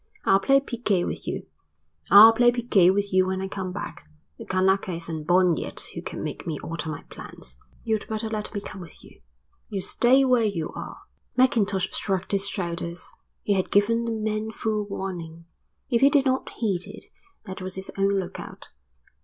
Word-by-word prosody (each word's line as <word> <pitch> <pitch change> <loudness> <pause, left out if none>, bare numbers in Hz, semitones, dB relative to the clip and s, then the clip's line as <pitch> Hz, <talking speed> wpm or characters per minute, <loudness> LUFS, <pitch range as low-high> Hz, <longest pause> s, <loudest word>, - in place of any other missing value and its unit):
I'll 195 - +5
play 275 +7 +4
piquet 230 -9 -1
with - - -5
you." - - -4 0.6
"I'll 215 +4 +10
play 240 +1 +5
piquet 235 -7 +3
with 200 +1 0
you 185 0 +4
when 190 0 -2
I 190 - -3
come 190 -1 -5
back. 180 - -7 0.3
The - - -8
Kanaka 190 0 +1
isn't 165 -2 -5
born 180 -2 +4
yet - - -5
who - - -6
can - - -6
make - - -6
me 155 -3 -2
alter 165 -1 -5
my 150 - -6
plans." 65 0 -6 0.3
"You'd 220 -2 -1
better 220 0 -2
let 215 -1 -4
me 205 - -4
come 190 -1 -9
with 165 -3 -12
you." - - -17 0.5
"You 200 - -3
stay 265 +3 +4
where 250 -3 +3
you 195 -7 -2
are." - - -8 0.4
Mackintosh 205 -7 +2
shrugged 190 -2 -1
his 200 -1 +4
shoulders. 170 -2 -4 0.3
He 205 - +1
had 190 -2 0
given 230 +3 +2
the 230 - -2
man 215 0 -2
full 215 -1 -2
warning. 170 -4 -6 0.5
If 235 - +2
he 275 - +7
did 285 -2 +3
not 260 0 0
heed 195 -6 -2
it - - -10 0.4
that 190 0 -7
was 185 0 -5
his 190 0 -5
own 195 0 +2
lookout. 180 - -8
195 Hz, 185 wpm, -25 LUFS, 185-220 Hz, 0.6 s, I'll